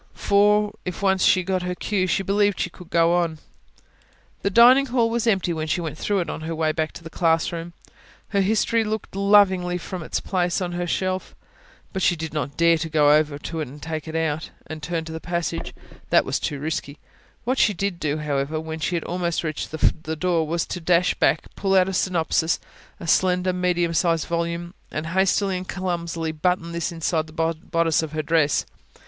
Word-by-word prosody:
For, 210 Hz, +1 st, +3 dB
if 180 Hz, +2 st, -5 dB
once 190 Hz, -1 st, +3 dB
she 185 Hz, -, +4 dB
got 185 Hz, 0 st, -1 dB
her 180 Hz, 0 st, -3 dB
cue, 190 Hz, -1 st, -1 dB
she 195 Hz, -, +1 dB
believed 205 Hz, +1 st, +2 dB
she -, -, -1 dB
could 180 Hz, -2 st, -14 dB
go 170 Hz, -1 st, +3 dB
on. 170 Hz, -2 st, +1 dB, 1.0 s
The -, -, +1 dB
dining 245 Hz, +6 st, +7 dB
hall 235 Hz, -2 st, +1 dB
was 235 Hz, 0 st, 0 dB
empty 190 Hz, -5 st, +2 dB
when 160 Hz, -1 st, -3 dB
she 175 Hz, -, 0 dB
went 160 Hz, -3 st, -4 dB
through 200 Hz, +4 st, 0 dB
it 170 Hz, -, -4 dB
on -, -, -5 dB
her 165 Hz, +1 st, -4 dB
way 160 Hz, -1 st, +1 dB
back 155 Hz, 0 st, -2 dB
to -, -, -11 dB
the 165 Hz, -, -9 dB
classroom: 165 Hz, 0 st, 0 dB, 0.6 s
her 200 Hz, -1 st, +2 dB
history 220 Hz, +3 st, +2 dB
looked 215 Hz, -2 st, -4 dB
lovingly 195 Hz, -3 st, +4 dB
at 180 Hz, -, -4 dB
her -, -, -10 dB
from 185 Hz, -2 st, -5 dB
its 160 Hz, -, -2 dB
place 180 Hz, -1 st, 0 dB
on 180 Hz, -2 st, -3 dB
the 175 Hz, 0 st, -2 dB
shelf. 185 Hz, +1 st, -2 dB, 0.6 s
But 190 Hz, -, -2 dB
she 175 Hz, -, +3 dB
did 160 Hz, -1 st, -6 dB
not 145 Hz, -2 st, -3 dB
dare 170 Hz, -1 st, +4 dB
to 160 Hz, -, -3 dB
go 150 Hz, -2 st, +4 dB
over 150 Hz, -1 st, +2 dB
to 160 Hz, +2 st, -5 dB
it, 150 Hz, -1 st, -6 dB
take 160 Hz, -2 st, -4 dB
it 160 Hz, -, -6 dB
out, 160 Hz, -1 st, -1 dB, 0.2 s
and 155 Hz, -1 st, -7 dB
turn 165 Hz, +2 st, -2 dB
up -, -, -10 dB
the 160 Hz, 0 st, -6 dB
passage: 170 Hz, 0 st, -3 dB, 0.4 s
that -, -, +4 dB
was -, -, -1 dB
too 145 Hz, -, -3 dB
risky. 145 Hz, -1 st, -4 dB, 0.5 s
What 255 Hz, +3 st, 0 dB
she 210 Hz, -, +4 dB
did 195 Hz, -1 st, -2 dB
do, 150 Hz, 0 st, -1 dB
however, 150 Hz, 0 st, -1 dB
when 160 Hz, 0 st, -6 dB
she 175 Hz, +3 st, -1 dB
had 165 Hz, -, -1 dB
almost 175 Hz, -1 st, -2 dB
reached 155 Hz, -2 st, -3 dB
the 160 Hz, 0 st, 0 dB
door, 165 Hz, -1 st, 0 dB
was 170 Hz, +2 st, -1 dB
to 180 Hz, -, -5 dB
dash 175 Hz, +2 st, +3 dB
back, -, -, +2 dB
pull 195 Hz, -1 st, +1 dB
out 185 Hz, -1 st, +5 dB
a 190 Hz, -, -3 dB
synopsis 165 Hz, -3 st, +1 dB, 0.4 s
[P.262] -, -, -20 dB
a -, -, -6 dB
slender, 180 Hz, +1 st, +2 dB
medium 175 Hz, -2 st, 0 dB
sized 165 Hz, -1 st, +1 dB
volume 170 Hz, +1 st, -3 dB, 0.2 s
and 155 Hz, -, -4 dB
hastily 190 Hz, 0 st, +2 dB
and 180 Hz, 0 st, -7 dB
clumsily 170 Hz, -3 st, -2 dB
button 170 Hz, +2 st, -1 dB
this 170 Hz, 0 st, -2 dB
inside 165 Hz, -1 st, -1 dB
the 155 Hz, -, -14 dB, 0.2 s
bodice 165 Hz, -1 st, 0 dB
of 160 Hz, -1 st, -5 dB
her 155 Hz, 0 st, -2 dB
dress. 155 Hz, -2 st, +2 dB
170 Hz, 210 wpm, -23 LUFS, 160-185 Hz, 1.0 s, dining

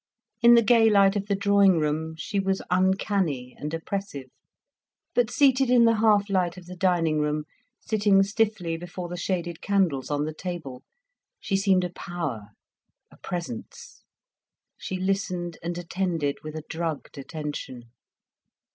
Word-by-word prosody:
In 240 Hz, 0 st, +8 dB
the 235 Hz, -, +5 dB
gay 225 Hz, 0 st, +5 dB
light 200 Hz, -1 st, +4 dB
of 200 Hz, 0 st, -2 dB
the 200 Hz, -, +1 dB
drawing 200 Hz, -2 st, +4 dB
room 160 Hz, +1 st, -1 dB
she 200 Hz, +4 st, -2 dB
was 195 Hz, 0 st, 0 dB
uncanny 185 Hz, -, 0 dB
and 150 Hz, -, -4 dB
oppressive. 165 Hz, -5 st, -5 dB, 0.8 s
But 240 Hz, -2 st, +2 dB
seated 270 Hz, -2 st, +3 dB
in 245 Hz, -2 st, +6 dB
the 230 Hz, -1 st, +4 dB
half 210 Hz, -2 st, +3 dB
light 185 Hz, -3 st, 0 dB
of 180 Hz, -, -11 dB
the 180 Hz, +1 st, -9 dB
dining 170 Hz, -4 st, +1 dB
room, 150 Hz, 0 st, 0 dB, 0.4 s
sitting 205 Hz, -3 st, +3 dB
stiffly 200 Hz, -5 st, -1 dB
before 175 Hz, +1 st, -7 dB
the 175 Hz, -, -5 dB
shaded 175 Hz, -2 st, -3 dB
candles 185 Hz, -10 st, +1 dB
on 145 Hz, 0 st, 0 dB
the 155 Hz, -, -4 dB
table, 155 Hz, -7 st, -6 dB, 0.6 s
she 195 Hz, -, -2 dB
seemed 195 Hz, -1 st, +3 dB
a 180 Hz, -, -3 dB
power, 160 Hz, -13 st, -5 dB, 0.6 s
a -, -, -18 dB
presence. 230 Hz, -, -7 dB, 0.7 s
She 190 Hz, -, -5 dB
listened 185 Hz, -3 st, -2 dB
and 170 Hz, +1 st, -4 dB
attended 170 Hz, -4 st, -2 dB
with 155 Hz, 0 st, -7 dB
a 155 Hz, -, -5 dB
drugged 160 Hz, -3 st, -4 dB
attention. 135 Hz, -5 st, -7 dB
180 Hz, 145 wpm, -26 LUFS, 160-200 Hz, 0.8 s, In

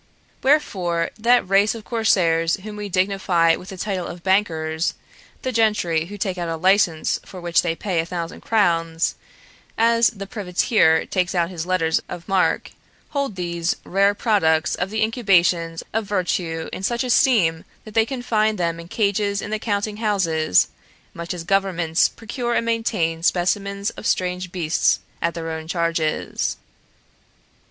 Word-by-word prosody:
Wherefore, 185 Hz, -, +1 dB
that 240 Hz, -1 st, +3 dB
race 200 Hz, +3 st, +3 dB
of 225 Hz, -, -9 dB
corsairs 170 Hz, -8 st, +2 dB
whom 215 Hz, 0 st, -7 dB
we 210 Hz, -1 st, -5 dB
dignify 185 Hz, -3 st, +2 dB
with 185 Hz, -, -11 dB
the 190 Hz, -, -8 dB
title 190 Hz, -2 st, -3 dB
of 175 Hz, -, -9 dB
bankers, 165 Hz, -5 st, 0 dB, 0.5 s
the 255 Hz, -, -1 dB
gentry 210 Hz, -8 st, +1 dB
who 205 Hz, +4 st, -9 dB
take 190 Hz, -2 st, -2 dB
out 170 Hz, -1 st, -2 dB
a 165 Hz, -, -2 dB
license 180 Hz, -2 st, +2 dB
for 185 Hz, -, -10 dB
which 170 Hz, -1 st, +2 dB
they 165 Hz, -2 st, -1 dB
pay 185 Hz, -1 st, -2 dB
a 165 Hz, -, 0 dB
thousand 170 Hz, -1 st, -5 dB
crowns, 165 Hz, -6 st, +1 dB, 0.6 s
as 230 Hz, +1 st, +4 dB
the 200 Hz, -4 st, -8 dB
privateer 180 Hz, -3 st, +2 dB
takes 180 Hz, 0 st, -1 dB
out 170 Hz, 0 st, +1 dB
his 170 Hz, -1 st, -5 dB
letters 165 Hz, -3 st, +1 dB
of 175 Hz, -1 st, -8 dB
marque, 195 Hz, -2 st, +1 dB, 0.4 s
hold 280 Hz, -7 st, -2 dB
these 170 Hz, -1 st, -1 dB
rare 200 Hz, +2 st, +2 dB
products 175 Hz, -8 st, +2 dB
of 180 Hz, -, -2 dB
the 220 Hz, +1 st, 0 dB
incubations 180 Hz, -7 st, +2 dB
of 225 Hz, 0 st, 0 dB
virtue 175 Hz, -4 st, -1 dB
in -, -, -5 dB
such 235 Hz, +5 st, 0 dB
esteem 225 Hz, -, +3 dB, 0.2 s
that 215 Hz, -, -11 dB
they 225 Hz, 0 st, +3 dB
confine 225 Hz, -4 st, 0 dB
them 170 Hz, -3 st, -1 dB
in 170 Hz, -, -9 dB
cages 200 Hz, 0 st, 0 dB
in 205 Hz, -, -5 dB
their 215 Hz, -, -1 dB
counting 210 Hz, -1 st, -2 dB
houses, 170 Hz, -, +2 dB, 0.4 s
much 170 Hz, 0 st, -6 dB
as 175 Hz, -2 st, -4 dB
governments 180 Hz, -3 st, +1 dB
procure 240 Hz, +1 st, -4 dB
and -, -, +1 dB
maintain 210 Hz, -8 st, 0 dB
specimens 200 Hz, +3 st, 0 dB
of -, -, -6 dB
strange 180 Hz, -1 st, -1 dB
beasts 165 Hz, -3 st, +1 dB, 0.2 s
at 170 Hz, 0 st, 0 dB
their 165 Hz, -1 st, -4 dB
own 160 Hz, 0 st, -6 dB
charges. 165 Hz, -2 st, -1 dB
185 Hz, 155 wpm, -22 LUFS, 170-210 Hz, 0.6 s, as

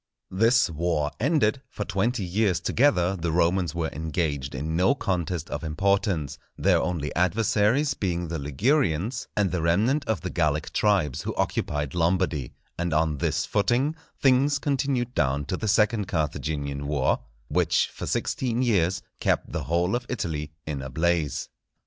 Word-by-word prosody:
This 115 Hz, +6 st, +4 dB
war 80 Hz, -2 st, -1 dB
ended, 135 Hz, -2 st, +2 dB
for 105 Hz, -, -5 dB
twenty 105 Hz, +3 st, 0 dB
years 95 Hz, 0 st, +1 dB
together 95 Hz, -3 st, +2 dB
the 85 Hz, -2 st, -2 dB
Romans 85 Hz, 0 st, +1 dB
were 85 Hz, -2 st, -1 dB
engaged 75 Hz, -3 st, -2 dB
in 80 Hz, +5 st, -3 dB
no 95 Hz, +11 st, +3 dB
contest 90 Hz, -, -2 dB
of -, -, -4 dB
importance, 85 Hz, -3 st, 0 dB, 0.2 s
their -, -, +3 dB
only 80 Hz, -5 st, -2 dB
adversaries 110 Hz, -, +2 dB
being 90 Hz, -5 st, -2 dB
the 80 Hz, -1 st, -3 dB
Ligurians, 100 Hz, -, 0 dB
and 100 Hz, -3 st, +2 dB
the 90 Hz, -, -1 dB
remnant 110 Hz, -, +2 dB
of 110 Hz, -7 st, -1 dB
the 95 Hz, -, -4 dB
Gallic 75 Hz, -3 st, 0 dB
tribes 95 Hz, -10 st, +2 dB
who -, -, -4 dB
occupied 75 Hz, -1 st, -1 dB
Lombardy; 85 Hz, -5 st, 0 dB, 0.2 s
and 85 Hz, -2 st, 0 dB
on 80 Hz, -2 st, +1 dB
this -, -, 0 dB
footing 125 Hz, +8 st, +1 dB, 0.2 s
things 135 Hz, +2 st, +4 dB
continued 135 Hz, -3 st, -1 dB
down 70 Hz, -, 0 dB
to 85 Hz, -, -2 dB
the 110 Hz, -, -3 dB
second 105 Hz, -1 st, +2 dB
Carthaginian 70 Hz, -3 st, -2 dB
war, 70 Hz, -3 st, +1 dB, 0.3 s
which -, -, +2 dB
for -, -, -6 dB
sixteen 125 Hz, -1 st, -1 dB
years 95 Hz, -6 st, +1 dB, 0.2 s
kept -, -, 0 dB
the -, -, -3 dB
whole 85 Hz, +6 st, +1 dB
of 120 Hz, 0 st, -3 dB
Italy 75 Hz, -10 st, -3 dB
in 75 Hz, -3 st, -4 dB
a 65 Hz, -, -6 dB
blaze. 80 Hz, +1 st, 0 dB
90 Hz, 155 wpm, -26 LUFS, 80-110 Hz, 0.3 s, This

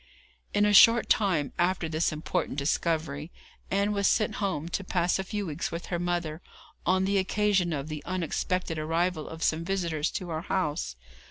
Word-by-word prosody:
In 205 Hz, 0 st, +3 dB
a 210 Hz, -, +3 dB
short 230 Hz, +3 st, +7 dB
time 175 Hz, -9 st, +2 dB
after 175 Hz, -1 st, +1 dB
this 160 Hz, +2 st, 0 dB
important 155 Hz, -1 st, -2 dB
discovery, 155 Hz, +1 st, -1 dB, 0.4 s
Ann 200 Hz, +1 st, +1 dB
was 200 Hz, -1 st, +2 dB
sent 215 Hz, -, +1 dB
home 170 Hz, -6 st, -1 dB
to 195 Hz, -, -2 dB
pass 180 Hz, -1 st, +1 dB
a -, -, -1 dB
few 205 Hz, +1 st, -3 dB
weeks 150 Hz, -4 st, -3 dB
with 170 Hz, +1 st, -5 dB
her 175 Hz, -, 0 dB
mother, 175 Hz, -2 st, -2 dB, 0.5 s
on 185 Hz, +1 st, +3 dB
the 200 Hz, 0 st, +2 dB
occasion 195 Hz, -2 st, +1 dB
of 140 Hz, -2 st, -3 dB
the 155 Hz, -2 st, -6 dB
unexpected 180 Hz, -1 st, -2 dB
arrival 165 Hz, +1 st, -1 dB
of 160 Hz, 0 st, -6 dB
some 160 Hz, +1 st, +1 dB
visitors 170 Hz, -4 st, -1 dB
to 180 Hz, -2 st, -4 dB
our 160 Hz, 0 st, -2 dB
house. 150 Hz, -, -2 dB
175 Hz, 175 wpm, -28 LUFS, 155-190 Hz, 0.5 s, short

